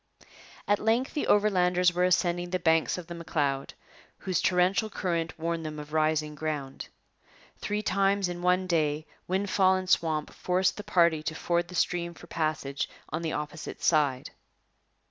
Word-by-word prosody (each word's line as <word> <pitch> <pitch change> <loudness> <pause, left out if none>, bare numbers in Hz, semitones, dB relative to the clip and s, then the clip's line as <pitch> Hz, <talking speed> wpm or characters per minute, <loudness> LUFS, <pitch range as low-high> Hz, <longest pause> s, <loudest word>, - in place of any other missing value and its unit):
At 205 0 +3
length 230 +4 +1
the 295 - -2
Overlanders 180 -4 +3
were 180 +1 +2
ascending 175 -1 +1
the 185 - 0
banks 165 -1 +2
of 180 - -7
the 170 - -8
M'Leod, 145 -5 -2 0.4
whose 185 -3 -1
torrential 185 +4 +2
current 170 -5 -2
warned 165 0 -2
them 155 -1 -5
of 150 0 -9
rising 155 -1 +1
ground. 150 -3 -4 0.7
Three 210 +1 -2
times 200 -1 +2
in 175 0 -5
one 180 +1 +2
day 155 -3 0 0.2
windfall 190 0 +2
and 185 0 -3
swamp 160 -4 +1
forced 185 +1 0
the 210 - -6
party 170 -5 +3
to 155 +1 -4
ford 175 +1 0
the 180 - -10
stream 170 -1 0
for - - -13
passage 155 -4 -2 0.2
on 155 +3 -3
the 160 -2 -2
opposite 150 +2 -6
side. 145 -5 +2
170 Hz, 160 wpm, -28 LUFS, 155-185 Hz, 0.7 s, At